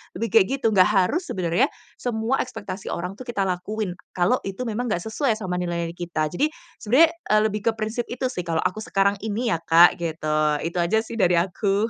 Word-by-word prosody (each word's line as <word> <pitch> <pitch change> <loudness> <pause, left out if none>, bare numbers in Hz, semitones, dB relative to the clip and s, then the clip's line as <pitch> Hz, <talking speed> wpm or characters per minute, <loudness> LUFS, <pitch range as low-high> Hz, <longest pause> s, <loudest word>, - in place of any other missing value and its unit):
lebih 220 +3 -3
kayak 220 -3 +6
gitu, 225 - +2
nggak 185 -3 +5
harus 210 - +1
sebenarnya, 185 - +1 0.3
semua 235 +2 -1
ekspektasi 215 -5 -5
orang 180 +3 -4
tuh 255 - -9
kita 235 -5 -1
lakuin, 185 0 -3 0.2
kalau 185 +8 +2
itu 195 +5 -4
memang 240 +1 -2
nggak 175 -6 -1
sesuai 225 +2 0
sama 185 -4 -3
nilainya 170 -1 -2
kita. 170 -3 -3
Jadi, 285 +12 +1 0.3
sebenarnya, 280 +10 +5 0.2
eee, 215 - +5
lebih 210 +2 -4
ke - - +5
prinsip 220 +2 -3
itu 250 +1 -3
sih 180 -7 -5
kalau 165 -1 0
aku 185 +3 -1
sekarang 200 +1 +3
ini 225 +3 -1
ya 190 - +1
Kak, 165 +1 +5
gitu. 160 -2 -4 0.3
Itu 170 +2 -4
aja 175 +6 +2
sih 225 +1 -8
dari 180 -4 +3
aku. 195 +5 +1
200 Hz, 200 wpm, -24 LUFS, 175-225 Hz, 0.3 s, kayak